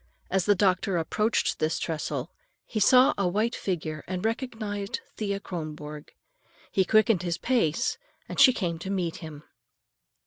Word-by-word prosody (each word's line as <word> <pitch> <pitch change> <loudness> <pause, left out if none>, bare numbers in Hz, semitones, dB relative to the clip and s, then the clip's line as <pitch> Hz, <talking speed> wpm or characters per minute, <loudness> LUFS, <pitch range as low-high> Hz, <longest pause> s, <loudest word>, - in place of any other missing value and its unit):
As 190 -1 +2
the 205 - +5
doctor 185 -1 +2
approached 210 +7 0
this 155 +1 0
trestle, 160 -2 -3 0.3
he 220 - -3
saw 255 +5 +6
a 195 - +2
white 215 +6 0
figure, 155 -5 -3
and 185 +2 -3
recognized 220 -3 -3 0.2
Thea 200 -2 -2
Kronborg. 150 -5 -7 0.6
He 190 - +2
quickened 215 -2 +4
his 175 -2 -2
pace 235 -4 +1 0.3
and - - -5
she 275 -2 +9
came 175 -9 -2
to 190 - -6
meet 180 -4 -1
him. 155 -2 -9
190 Hz, 145 wpm, -27 LUFS, 165-215 Hz, 0.6 s, she